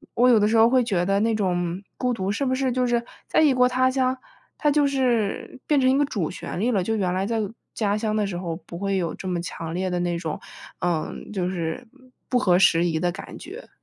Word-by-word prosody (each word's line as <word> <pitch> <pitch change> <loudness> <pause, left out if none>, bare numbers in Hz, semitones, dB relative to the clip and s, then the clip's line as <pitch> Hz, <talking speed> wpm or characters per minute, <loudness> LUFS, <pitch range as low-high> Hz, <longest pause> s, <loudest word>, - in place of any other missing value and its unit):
我 250 +2 +5
有 235 -3 +6
的 210 - +3
时 225 - +1
候 225 +1 +6
会 255 +1 +4
觉 180 -6 0
得 195 +1 +2
那 225 0 +2
种 180 -3 -1 0.2
孤 250 -1 0
独， 195 -3 -2
是 250 +7 -1
不 260 - +1
是 260 -1 0
就 250 0 +1
是 235 -1 +1 0.2
在 - - +3
异 300 -3 +5
国 250 0 +4
他 255 +1 +2
乡， 260 0 +1 0.4
它 300 - +2
就 290 0 +3
是 250 -4 0
变 295 -2 +3
成 260 - +4
一 265 - +3
个 290 - +3
主 200 - -2
旋 - - -6
律 240 +4 +1
了？ 200 - +2
就 220 +4 -1
原 185 -4 0
来 190 +1 0
在 230 +2 -1 0.4
家 205 -1 0
乡 215 -1 -1
的 210 -2 +1
时 180 -3 -4
候 170 -2 -3
不 170 0 -10
会 195 +1 -1
有 170 -3 -2
这 185 - -7
么 180 -2 -1
强 165 -1 -6
烈 185 +1 -1
的 180 -1 -1
那 175 -1 -1
种， 160 -3 -4 0.4
嗯， 170 +2 -2
就 185 -3 -1
是 175 +6 -4 0.4
不 250 - +2
合 185 -6 +3
时 170 -2 +4
宜 160 -2 0
的 175 +1 +1
感 200 - -9
觉？ - - -10
205 Hz, 270 characters per minute, -24 LUFS, 180-250 Hz, 0.4 s, 有